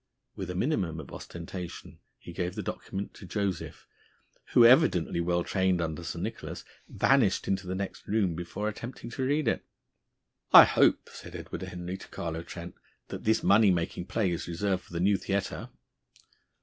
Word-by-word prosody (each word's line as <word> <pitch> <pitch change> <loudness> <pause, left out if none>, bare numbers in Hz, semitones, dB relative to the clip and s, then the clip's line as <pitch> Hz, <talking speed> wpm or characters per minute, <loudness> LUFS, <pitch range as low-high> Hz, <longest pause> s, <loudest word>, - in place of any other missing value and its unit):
With 95 -2 -5
a 90 - -4
minimum 90 - 0
of 75 - -10
ostentation 85 +1 -8 0.2
he 85 - -11
gave 90 0 -3
the - - -4
document 100 +1 -5
to 95 - -11
Joseph, 100 -3 -3 0.7
who, 120 - +8
evidently 115 - +5
well 85 0 +1
trained 95 -1 +1
under 80 -2 -3
Sir - - -5
Nicholas, - - -5 0.2
vanished 120 -8 +3
into 95 -1 -1
the 95 - -2
next 100 0 -5
room 100 -5 +1
before 85 +5 -4
attempting 115 +3 -6
to 130 - -3
read 145 +1 +1
it. - - +1 0.9
"I - - +12
hope," - - +3
said - - -10
Edward - - -6
Henry 90 +1 -5
to - - -11
Carlo 80 -1 -4
Trent, 85 +1 -8 0.4
"that - - -7
this 110 0 +2
money 105 +1 +6
making 85 0 -1
play 105 -6 0
is 85 0 -3
reserved 90 +2 -1
for - - -16
the 85 - -2
new 100 +3 +3
theatre." 100 0 -3
95 Hz, 170 wpm, -29 LUFS, 85-105 Hz, 0.9 s, I